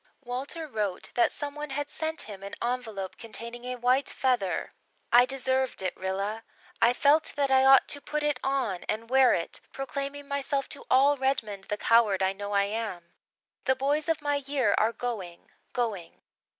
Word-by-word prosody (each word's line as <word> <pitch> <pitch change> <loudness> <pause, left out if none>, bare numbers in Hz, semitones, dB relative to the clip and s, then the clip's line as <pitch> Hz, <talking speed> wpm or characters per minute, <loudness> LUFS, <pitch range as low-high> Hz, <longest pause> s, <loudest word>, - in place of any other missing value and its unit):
Walter 270 +6 -4
wrote 210 -8 -3
that 240 - +3
some 285 -1 -5
one 300 0 -6
had 285 +2 -3
sent 315 +1 -2
him 200 -3 -9
an 200 0 -7
envelope 225 -6 -3
containing 235 +1 -5
a 250 0 -3
white 250 +3 +2
feather. 245 -9 0 0.4
"I 245 +1 +7
deserved 260 -4 0
it, 185 - -2
Rilla. 195 +4 -3 0.4
I 235 - +6
felt 290 +5 +3
that 280 -2 +1
I 265 0 +5
ought 270 0 +7
to 285 - -3
put 300 +1 -3
it 295 -3 +1
on 255 -10 -1
and 225 +2 -3
wear 265 -1 +6
it 170 - -4
proclaiming 280 +1 -5
myself 280 0 -1
to 280 - -8
all 280 +2 +5
Redmond 225 -7 -1
the 210 - -3
coward 215 -5 +4
I 190 0 +2
know 205 +1 -6
I 200 0 +4
am. 200 -5 -4 0.5
The 260 - +3
boys 290 +4 0
of 315 -2 0
my 290 -1 +1
year 275 -6 +1
are 220 +2 +3
going 220 -7 -6 0.2
going. 210 -9 -3
250 Hz, 175 wpm, -28 LUFS, 210-275 Hz, 0.5 s, I